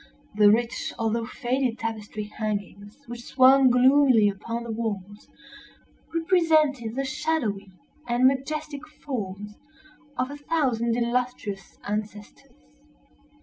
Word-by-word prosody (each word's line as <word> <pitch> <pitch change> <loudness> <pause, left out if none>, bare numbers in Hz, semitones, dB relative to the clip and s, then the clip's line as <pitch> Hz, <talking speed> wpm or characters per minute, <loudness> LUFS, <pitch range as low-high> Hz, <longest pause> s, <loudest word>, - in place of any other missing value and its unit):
The 210 0 +6
rich 235 +3 0
although 225 0 -1
faded 250 -1 -1
tapestry 215 -1 -5
hangings 205 0 -5
which 240 0 -8
swung 260 +1 +5
gloomily 250 -3 +5
upon 230 +4 -5
the 235 - -6
walls, 205 -3 -5 0.8
represented 315 -8 +2
the 275 +1 -1
shadowy 250 -8 -2 0.4
and 240 +1 +2
majestic 280 +2 0
forms 210 -9 -6 0.6
of 255 +2 -1
a 290 - -7
thousand 250 -7 0
illustrious 235 -5 -3
ancestors. 210 0 -6
235 Hz, 105 wpm, -25 LUFS, 210-270 Hz, 0.8 s, The